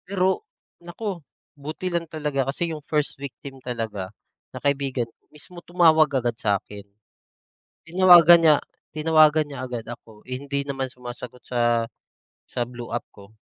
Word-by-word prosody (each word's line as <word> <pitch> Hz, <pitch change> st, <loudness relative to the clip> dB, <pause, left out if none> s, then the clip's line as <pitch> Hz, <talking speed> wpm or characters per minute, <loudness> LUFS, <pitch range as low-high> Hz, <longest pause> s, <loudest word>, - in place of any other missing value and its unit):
Pero 190 Hz, -, +1 dB, 0.4 s
naku, 175 Hz, +1 st, -6 dB, 0.3 s
buti 155 Hz, +5 st, -6 dB
lang 170 Hz, -1 st, -1 dB
talaga 145 Hz, -4 st, -2 dB
kasi 165 Hz, +4 st, -2 dB
yung 155 Hz, -, -7 dB
first 150 Hz, -1 st, 0 dB
victim 135 Hz, -1 st, -9 dB
talaga, 110 Hz, -6 st, -4 dB, 0.4 s
na -, -, -6 dB
kaibigan 135 Hz, -3 st, 0 dB, 0.3 s
mismo, 170 Hz, +3 st, -14 dB
tumawag 160 Hz, -4 st, +4 dB
agad 120 Hz, -2 st, -1 dB
sa'kin. 100 Hz, -1 st, -2 dB, 1.0 s
Tinawagan 175 Hz, -1 st, +8 dB
niya 155 Hz, -2 st, +7 dB, 0.3 s
tinawagan 155 Hz, 0 st, +4 dB
niya 140 Hz, -3 st, -8 dB
agad 120 Hz, -2 st, -5 dB
ako, 115 Hz, -2 st, -12 dB
hindi 140 Hz, +2 st, -4 dB
naman 135 Hz, -2 st, -3 dB
sumasagot 125 Hz, 0 st, -10 dB
sa 120 Hz, -1 st, +1 dB, 0.8 s
blue 120 Hz, -1 st, -8 dB
app -, -, -1 dB
ko. 100 Hz, +1 st, -17 dB
140 Hz, 130 wpm, -24 LUFS, 120-160 Hz, 1.0 s, Tinawagan